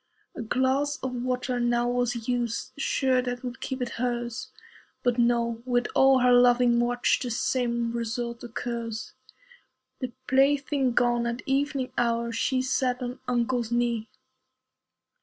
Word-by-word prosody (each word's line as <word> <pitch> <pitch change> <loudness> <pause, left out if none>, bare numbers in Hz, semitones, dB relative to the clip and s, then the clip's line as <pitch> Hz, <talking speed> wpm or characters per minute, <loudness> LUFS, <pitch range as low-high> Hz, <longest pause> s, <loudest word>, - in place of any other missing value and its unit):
A - - -5
glass 265 +5 +1
of 260 -1 -2
water 250 0 -2
now 240 0 +1
was 245 -2 -1
used, 245 0 -1
Sure 265 -2 +1
that 245 0 -4
would 250 0 -6
keep 260 -1 -3
it 245 - -3
hers. 240 -2 -2 0.5
But 245 -1 +1
no! 235 -1 +1
with 245 -1 +1
all 265 -1 +5
her 250 0 +5
loving 245 -1 +5
watch 245 0 +2
The 250 - -3
same 235 0 0
result 235 0 -3
occurs. 235 -1 -5 0.9
The 255 -2 -4
plaything 275 -1 +2
gone, 240 0 +2
at 235 +2 -4
evening 275 -1 0
hour 235 0 0
She 255 +3 0
sat 255 -1 0
on 250 +1 -5
uncle's 240 -1 0
knee. 235 -2 0
245 Hz, 140 wpm, -27 LUFS, 235-255 Hz, 0.9 s, all